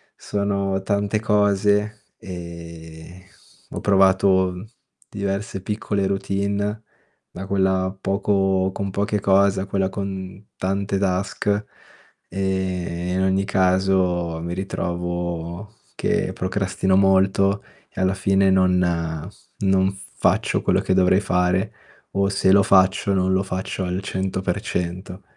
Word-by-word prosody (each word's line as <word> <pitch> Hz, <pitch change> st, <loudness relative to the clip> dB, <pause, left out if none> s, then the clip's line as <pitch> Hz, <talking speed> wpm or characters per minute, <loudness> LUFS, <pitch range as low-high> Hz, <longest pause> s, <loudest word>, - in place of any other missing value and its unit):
sono 100 Hz, -1 st, -1 dB
tante 100 Hz, +1 st, 0 dB
cose, 105 Hz, 0 st, +1 dB
ehm, 85 Hz, -1 st, -9 dB, 0.5 s
ho -, -, -5 dB
provato, 95 Hz, -1 st, +4 dB
mhmm, 90 Hz, +4 st, -8 dB, 0.4 s
diverse 100 Hz, 0 st, -3 dB
piccole 105 Hz, -1 st, -2 dB
routine 100 Hz, +2 st, -2 dB, 0.5 s
da 95 Hz, +2 st, -6 dB
quella 95 Hz, -1 st, +1 dB
poco 95 Hz, -1 st, +1 dB
con 100 Hz, -1 st, -3 dB
poche 100 Hz, +1 st, 0 dB
cose 95 Hz, 0 st, +3 dB
a -, -, -3 dB
quella 95 Hz, -1 st, 0 dB
con 95 Hz, 0 st, -6 dB
tante 100 Hz, +1 st, -1 dB
task, 95 Hz, +1 st, -1 dB
ehm, 105 Hz, +1 st, +2 dB, 1.4 s
e -, -, -2 dB
in 95 Hz, -, 0 dB
ogni 95 Hz, +1 st, +1 dB
caso 95 Hz, -3 st, +1 dB
mi 85 Hz, +1 st, -4 dB
ritrovo 90 Hz, +1 st, -4 dB, 0.2 s
che -, -, 0 dB
procrastino 95 Hz, 0 st, 0 dB
molto 95 Hz, +1 st, +3 dB, 0.3 s
e 95 Hz, -, -6 dB
alla 95 Hz, 0 st, +2 dB
fine 95 Hz, 0 st, +2 dB
non 90 Hz, -1 st, +3 dB, 0.8 s
non 95 Hz, -1 st, +2 dB, 0.2 s
faccio -, -, +1 dB
quello -, -, +2 dB
che -, -, 0 dB
dovrei 95 Hz, +1 st, +4 dB
fare, 90 Hz, 0 st, +1 dB, 0.4 s
o 100 Hz, 0 st, +1 dB
se 95 Hz, -1 st, +2 dB
lo 100 Hz, 0 st, +6 dB
faccio 95 Hz, +1 st, +3 dB
non 95 Hz, 0 st, +1 dB
lo 95 Hz, +1 st, +2 dB
faccio 95 Hz, 0 st, -4 dB
al 90 Hz, +2 st, -2 dB
100%. 95 Hz, -1 st, -3 dB
95 Hz, 120 wpm, -22 LUFS, 95-100 Hz, 1.4 s, lo